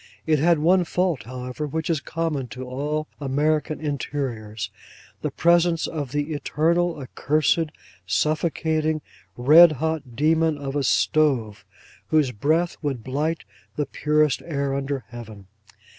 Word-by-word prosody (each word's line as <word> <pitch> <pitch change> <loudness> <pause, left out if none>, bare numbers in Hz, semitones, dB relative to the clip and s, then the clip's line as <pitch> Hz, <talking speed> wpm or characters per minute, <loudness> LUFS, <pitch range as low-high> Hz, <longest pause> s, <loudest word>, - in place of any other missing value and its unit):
It 155 -2 +2
had 170 +3 +4
one 175 +4 +4
fault, 175 - -1
however, 125 +4 -5
which 160 +2 -3
is 165 -3 +1
common 155 -6 -2
to 125 +4 -7
all 150 +4 -2
American 150 +2 0
interiors: 120 -8 -4 0.5
the - - -1
presence 170 0 +3
of 145 -6 -4
the 145 +2 -2
eternal, 170 +4 +1
accursed, 150 +4 +1 0.4
suffocating, 155 - 0 0.3
red 155 +6 +8
hot 155 -4 -3
demon 160 +2 +2
of 140 -1 -5
a 145 - +1
stove, 130 -6 +1 0.4
whose 150 -5 +2
breath 160 +10 0
would 135 -7 -3
blight 150 +6 -2 0.3
the 150 - -1
purest 150 0 +1
air 140 -4 -2
under 135 -1 -3
Heaven. 110 -4 -10
150 Hz, 130 wpm, -24 LUFS, 135-160 Hz, 0.5 s, red